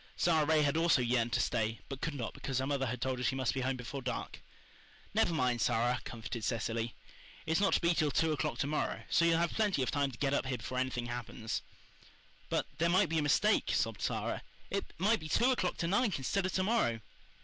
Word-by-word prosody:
Sara 160 -3 +3
Ray 155 -1 +4
had 145 +2 +1
also 165 -6 +4
yearned 120 -1 +1
to - - +2
stay, 110 -1 0
but 135 -1 -7
could 160 -3 -2
not 120 -5 -4
because 135 -2 -3
her 130 - 0
mother 135 -1 0
had 125 +1 -3
told 130 -1 -1
her - - -3
she 130 - +1
must 130 -2 0
be 135 - -2
home 130 +1 0
before 130 +2 -6
dark. 125 0 -4 0.7
"Never - - +3
mind, 125 -7 +1
Sara," 120 +4 +1
comforted 115 0 -6
Cecily. 115 0 -2 0.5
"It's 160 +2 +1
not 195 - +3
to - - +4
be 170 0 +3
till 155 -2 +2
two 160 +3 +2
o'clock 150 - -1
to - - 0
morrow, 150 +2 -2
so 170 - +4
you'll 165 -1 +4
have 170 0 +1
plenty 205 -10 +1
of 120 - -1
time 140 +2 +1
to 125 - -10
get 140 +1 0
up 140 - 0
here 130 -1 -1
before 130 +1 -4
anything 130 -2 -1
happens." 120 -2 -4 0.9
"But - - 0
there 170 +1 +3
might 185 0 +4
be 165 0 +1
a - - +1
mistake," 195 +9 +3
sobbed - - -1
Sara. - - -2 0.3
"It 200 0 -1
might 215 +6 +3
be 155 -1 -8
two 245 +10 +3
o'clock 185 -8 0
to 170 - -1
night 205 0 +2
instead 185 +8 0
of - - -5
to 185 - +1
morrow." 185 - +1
140 Hz, 235 wpm, -33 LUFS, 125-170 Hz, 0.9 s, Ray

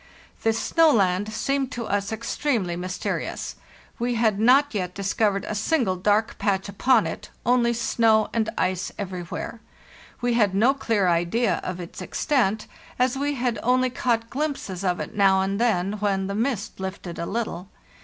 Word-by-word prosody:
This 225 0 +1
snow 330 +5 +4
land 200 -2 +2
seemed 270 +4 -1
to 235 -1 -4
us 200 0 -1
extremely 220 -4 -1
mysterious; 180 +1 -4 0.4
we 240 +1 0
had 220 -3 +2
not 265 +5 +5
yet 180 -3 -3
discovered 200 0 0
a - - -2
single 215 -2 +1
dark 210 +4 +1
patch 195 -2 0
upon 225 +6 +3
it, - - -6 0.2
only 240 -1 +3
snow 225 -2 +2
and 225 -2 +1
ice 185 0 -1
everywhere. 185 +3 -5 0.6
We 245 -1 0
had 210 -5 +2
no 235 +7 +4
clear 225 -8 0
idea 175 +4 +1
of 185 -1 -4
its 175 -1 -8
extent, 220 -8 0 0.3
as 255 +1 +2
we 285 +1 -1
had 240 -3 -1
only 255 +1 +2
caught 230 -2 -1
glimpses 270 - -3
of 180 -2 0
it - - -5
now 195 -2 +4
and 195 +3 -1
then 200 -5 +1
when 195 -2 0
the 200 - -3
mist 225 -1 -2
lifted 190 -2 -6
a 170 - -3
little. 200 -4 -3
215 Hz, 165 wpm, -24 LUFS, 190-245 Hz, 0.6 s, not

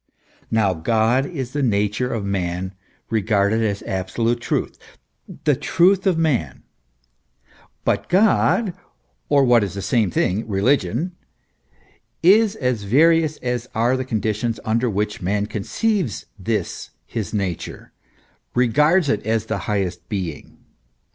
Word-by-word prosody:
Now 105 -4 +2
God 115 +9 +1
is 130 -7 -5
the 145 - -1
nature 105 +1 0
of 110 -3 -3
man 95 -1 -2 0.4
regarded 110 0 +2
as 100 -2 -1
absolute 115 +6 -1
truth, - - -2 0.6
the 150 -2 +3
truth 185 +7 +2
of 180 -3 +3
man; 135 - 0 1.2
but - - 0
God, 200 +1 +3 0.6
or, 140 -2 +4
what 120 -3 +5
is 95 -2 -4
the 100 - -4
same 110 -1 +2
thing, 95 +6 0
religion, 115 - +1 1.1
is 210 +4 +5
as 125 - -1
various 155 +8 +3
as 125 -1 -2
are 120 +3 +2
the 130 - -2
con 115 -5 -2
ditions 110 +1 -1
under 115 +3 +1
which 105 0 -2
man 100 +3 0
conceives 155 - -2
this 105 -2 -3 0.2
his 110 -7 -4
nature, 95 -5 -4 0.6
regards 150 +8 +3
it 110 -6 0
as 110 0 0
the - - -2
highest 95 -4 -2
being. 90 -7 -5
115 Hz, 130 wpm, -21 LUFS, 100-140 Hz, 1.2 s, what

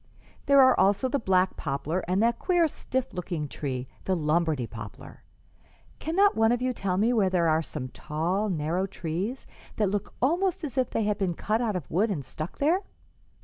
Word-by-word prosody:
There 280 0 +6
are 260 -1 +7
also 205 +6 +3
the 275 +2 0
black 185 -3 +2
poplar 145 +6 -2
and 185 +4 +2
that 235 0 +2
queer, 350 -3 +3
stiff 260 -3 -3
looking 170 -4 -3
tree 130 -3 -4 0.2
the 190 - +1
Lombardy 155 -4 +1
poplar. - - -10 0.8
Cannot 390 +5 +3
one 225 +1 +4
of 245 - +1
you 255 0 0
tell 190 -5 -1
me 225 +5 +3
where 205 -5 +3
there 175 -2 +2
are 160 0 +3
some 145 -4 -5
tall, 170 - -2
narrow 170 +2 -1
trees 190 +7 -4 0.3
that 210 -3 +1
look 205 -1 -3
almost 345 +8 +1
as 275 -5 -4
if 260 -2 +1
they 225 - -1
had 210 0 0
been 185 -4 0
cut 215 +6 0
out 220 -4 0
of 175 -6 -5
wood 205 +7 +2
and 150 -10 -3
stuck 155 +5 -6
there?" 330 +7 +2
195 Hz, 190 wpm, -27 LUFS, 165-245 Hz, 0.8 s, are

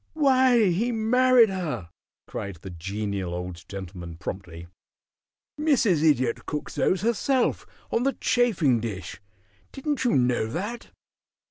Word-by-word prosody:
"Why, 260 - +4
he 225 +8 0
married 240 0 +4
her!" 150 - -4 0.3
cried 100 -2 -6
the 90 +3 -10
Genial 95 +1 -4
Old 90 -1 -6
Gentleman, 90 -4 -7
promptly. 90 -2 -7 0.9
"Mrs. 255 - +3
Idiot 130 -6 +2
cooks 150 - -4
those 185 - +1
herself, 235 +4 +1 0.2
on 230 - +1
the 275 +2 +1
chafing 185 - +2
dish. 100 -6 -6 0.5
Didn't 285 0 -2
you 245 - +2
know 125 -3 +2
that?" 205 - -5
155 Hz, 120 wpm, -25 LUFS, -, 0.9 s, Why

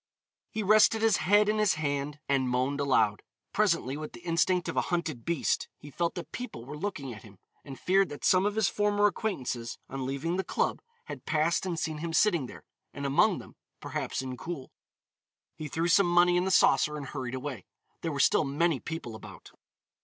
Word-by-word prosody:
He 220 - -3
rested 215 +2 +5
his 225 -2 +4
head 205 +2 +4
in 215 0 +1
his 210 -5 +3
hand, 145 -1 -2
and 135 -2 +1
moaned 130 +3 0
aloud. 130 -7 +2 0.3
Presently, 170 -10 +1
with 155 0 -7
the - - -11
instinct 175 +1 +1
of - - -3
a - - +3
hunted 165 -9 -2
beast, 170 -4 0
he 145 - -12
felt 170 +4 -1
that 175 - -7
people 245 - -7
were 145 +3 -7
looking 150 -7 -4
at 110 - -11
him. 100 -3 -15 0.3
He 135 - -8
feared 190 +6 +2
that 145 - -6
some 185 0 +5
of 205 - -2
his 220 -3 +3
former 205 0 +2
acquaintances, 130 - -2
on 135 -1 -3
leaving 155 +6 -2
the 190 - 0
club, - - -1 0.2
had - - -9
passed 165 +4 +1
and 175 -2 -2
seen 155 -1 -3
him 165 +1 -4
sitting 170 -7 +3
there, - - -12 0.3
and 140 - -4
among 170 +8 +3
them, - - -11 0.2
perhaps - - -3
Incoul. 130 +3 -6 0.9
He 155 - -6
threw 165 +4 -1
some 175 +2 +5
money 175 0 +5
in 180 +1 +2
the - - 0
saucer 150 -4 +4
and 145 - -6
hurried 130 -2 -5
away. 130 -6 -6 0.3
There 165 - -2
were 140 - -4
still 140 - +4
many 150 +1 +1
people 160 -7 -6
about. 110 - -11
160 Hz, 200 wpm, -29 LUFS, 135-185 Hz, 0.9 s, rested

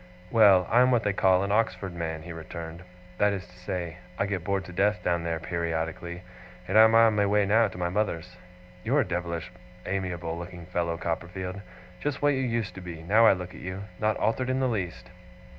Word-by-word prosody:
'Well, 100 -5 +6
I 120 +2 +6
am 125 - +5
what 120 -3 +3
they 105 - +1
call 95 -1 +3
an 100 - -2
Oxford 105 -3 0
man,' 80 -2 -4
he 85 0 -7
returned; 80 +1 -8 0.4
'that 105 0 +4
is 95 -2 -5
to - - -19
say, 90 -2 -4 0.2
I 100 - +1
get 100 -4 -3
bored 95 0 -1
to 90 - -10
death 105 +3 +1
down 85 -1 +1
there, 85 -1 -2
periodically 85 +1 -3 0.4
and 95 - -2
I 110 +1 +9
am 110 0 +4
on 115 -1 +6
my 100 -1 +2
way 105 0 +3
now 110 +3 +4
to 95 - -10
my 90 -1 -1
mother's. 90 -3 -2 0.5
You're 140 +6 +3
a 120 - -2
devilish 85 -1 -3 0.3
amiable 90 -4 -3
looking 85 0 -8
fellow, 85 -1 -2
Copperfield. 90 +3 -4 0.4
Just 145 -1 -2
what 145 0 +3
you 130 - -1
used 115 -7 -1
to 95 - -9
be, 85 -3 -8
now 110 +6 +5
I - - +7
look 90 -1 -6
at 80 - -11
you! 95 +2 -5 0.2
Not 110 0 +1
altered 125 +3 0
in 130 0 +1
the 130 - +2
least! 90 - -4
95 Hz, 215 wpm, -27 LUFS, 85-105 Hz, 0.5 s, I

